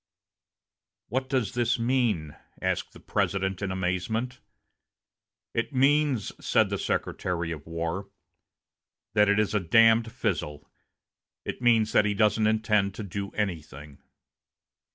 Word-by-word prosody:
"What 130 +2 -2
does 130 -7 0
this 120 -1 +1
mean?" 115 - 0 0.2
asked - - -2
the - - -13
President, 95 -1 -1
in 100 -2 -2
amazement. 95 +7 -2 1.1
"It 115 +5 -2
means," 140 -4 +2
said - - +2
the - - -1
Secretary 85 -2 -2
of 80 -2 -7
War, 85 +4 -3 1.0
"that 105 -1 +4
it 100 - +3
is 105 -1 +1
a 105 - +3
damned 115 +5 +4
fizzle. 75 -8 -3 0.8
It - - -5
means 115 -3 +4
that 105 - +4
he 105 -1 0
doesn't 110 +1 +3
intend 105 -3 +1
to 110 - -5
do 100 +1 -4
anything." 75 -8 -5
105 Hz, 125 wpm, -27 LUFS, 90-115 Hz, 1.1 s, that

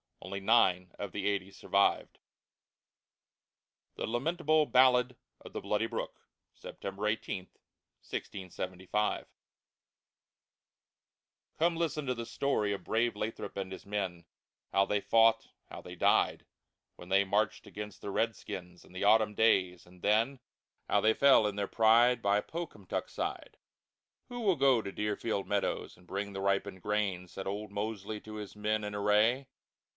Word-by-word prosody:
Only 100 +1 -5
nine 95 -4 +3
of 100 -2 -5
the 100 -1 -2
eighty 100 -1 -1
survived. 100 +1 +1 1.8
THE - - -3
LAMENTABLE 155 +5 +1
BALLAD 125 -1 +4 0.3
OF - - -12
THE - - -4
BLOODY 105 +2 0
BROOK - - -4 0.4
[September 100 +2 -5
18, 105 -3 -3 0.5
1675] 95 +2 -3 2.3
Come 170 +1 +2
listen 160 -3 -1
to 125 -1 -1
the 115 0 -5
Story 115 -6 0
of 95 -2 -6
brave 115 +3 +1
Lathrop 105 0 -5
and 95 -1 -4
his 95 - -8
Men, 95 -4 -3 0.5
How 100 0 +4
they 105 0 0
fought, 115 +1 +4 0.2
how - - -8
they 90 - -9
died, - - +2 0.5
When 90 - -12
they 100 +1 +4
marched 105 +2 0
against 105 -2 -8
the 100 - -5
Red 115 +2 0
Skins 90 -1 -8
in - - -18
the 95 - -4
Autumn 105 0 +4
Days, 95 -6 +2
and 90 0 -18
then 115 +6 +2 0.5
How - - +3
they 110 +1 +4
fell, 135 -5 +6
in 105 -1 -1
their 100 -1 -1
pride, 120 +2 +4
By 100 +1 +2
Pocumtuck 155 - -5
Side. - - -5 0.7
"Who 245 0 -6
will 195 -5 +3
go 135 -4 +4
to 100 - -6
Deerfield 105 0 -2
Meadows 100 -1 -1
and 90 0 -21
bring 100 +2 -4
the 95 - -4
ripened 100 -1 0
Grain?" 100 -3 -1
Said 95 +2 -7
old 100 +1 -4
Mosely 105 0 -4
to 110 0 -9
his 105 -1 -7
men 105 +1 -1
in 105 0 -4
Array. 105 +6 +3
105 Hz, 150 wpm, -31 LUFS, 100-115 Hz, 2.3 s, fell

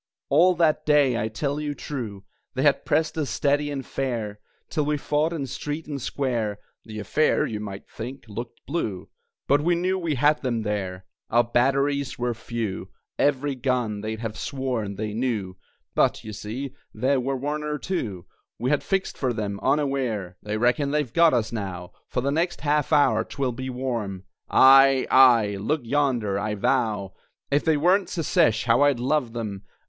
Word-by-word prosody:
All 175 +6 +5
that 160 -2 +2
day, 145 -4 +4
I 110 - 0
tell 140 +6 -2
you 145 -1 -3
true, 110 -11 -6 0.3
They 130 - 0
had 145 -2 +3
pressed 155 +1 +1
us 145 - -1
steady 145 +1 +1
and 140 -2 -4
fair, 115 -6 -3 0.3
Till 155 - -1
we 150 0 0
fought 150 +3 0
in 155 -5 -3
street 145 +5 -5
and 145 -3 -5
square 115 -6 -1 0.3
(The 110 -1 -8
affair, 135 +9 +2
you 105 - -4
might 100 -2 -7
think, 125 +5 -7
looked 115 +3 -8
blue), 115 - -3 0.4
But 145 +1 +4
we 175 +3 +2
knew 185 +2 0
we 165 -4 -1
had 150 +4 +3
them 120 -4 -1
there! 95 -3 -3 0.2
Our 120 +1 +4
batteries 140 +3 +1
were 120 0 -1
few, 115 -3 -4 0.3
Every 145 0 +2
gun, 125 -5 -1
they'd 110 +1 -4
have 110 -2 -5
sworn, 125 -7 -3
they 105 +1 -4
knew, 110 -6 -2 0.4
But, - - +2
you 110 - -7
see, 125 +6 -5 0.2
there 135 +1 +2
were 135 +2 -1
one 145 +3 -2
or 150 0 -2
two 115 - -4 0.3
We 125 +3 -1
had 145 - +2
fixed 195 -1 -1
for 130 -3 0
them, 100 -3 -3
unaware. 130 -9 0
They 105 0 -3
reckon 125 +5 +2
they've 145 -5 -1
got 170 -1 +6
us 115 -1 0
now! 95 -5 -5 0.2
For - - -2
the 140 +2 0
next 170 +4 -1
half 150 0 +1
hour 145 -2 +4
'twill 135 -2 -2
be 130 +2 -5
warm 120 -7 -3 0.3
Aye, 135 0 +7
aye, 115 -6 +6
look 145 +9 0
yonder! 120 -6 0
I 105 +1 -2
vow, 105 -3 0 0.4
If 145 +1 +2
they 160 -2 +3
weren't 180 +6 +3
Secesh, 160 - +2
how 120 +2 +3
I'd 145 -4 +4
love 130 -2 0
them! 105 -5 -4
130 Hz, 175 wpm, -25 LUFS, 110-145 Hz, 0.4 s, Aye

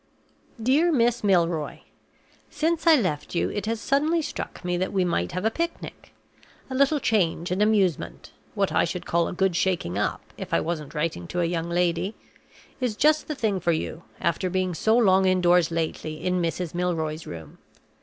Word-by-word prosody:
"DEAR 280 +9 +3
MISS 240 -5 +2
MILROY 170 -6 +1 0.7
Since 325 +2 -1
I 325 - +9
left 180 - -1
you - - +1
it 205 0 -4
has 225 0 -1
suddenly 305 +7 +1
struck - - -6
me 180 0 0
that 185 +2 -1
we 190 -2 +1
might 90 - -1
have 185 +3 -3
a 220 - +3
picnic. 335 +6 -5 0.6
A - - -2
little 280 +3 +3
change 180 -8 0
and 185 +3 0
amusement 205 -6 +1 0.2
(what - - +1
I - - +3
should - - -3
call 170 0 +1
a - - -4
good 190 -1 +1
shaking 175 - 0
up, - - -1 0.2
if - - -2
I - - +4
wasn't 160 -3 -4
writing 150 - -2
to 180 - -2
a - - +2
young 170 0 -2
lady) 175 +3 0 0.6
is 250 -5 -1
just 305 +5 +3
the 305 - -3
thing 215 -7 0
for 170 -1 +1
you, 160 +1 -4 0.2
after 170 +2 0
being 185 0 -1
so 220 +7 +2
long 190 -4 +4
indoors 180 -2 +4
lately 160 -1 -3
in 180 -1 +1
Mrs. 170 0 -2
Milroy's 165 -3 -2
room. 80 -3 -9
185 Hz, 185 wpm, -25 LUFS, 170-225 Hz, 0.7 s, I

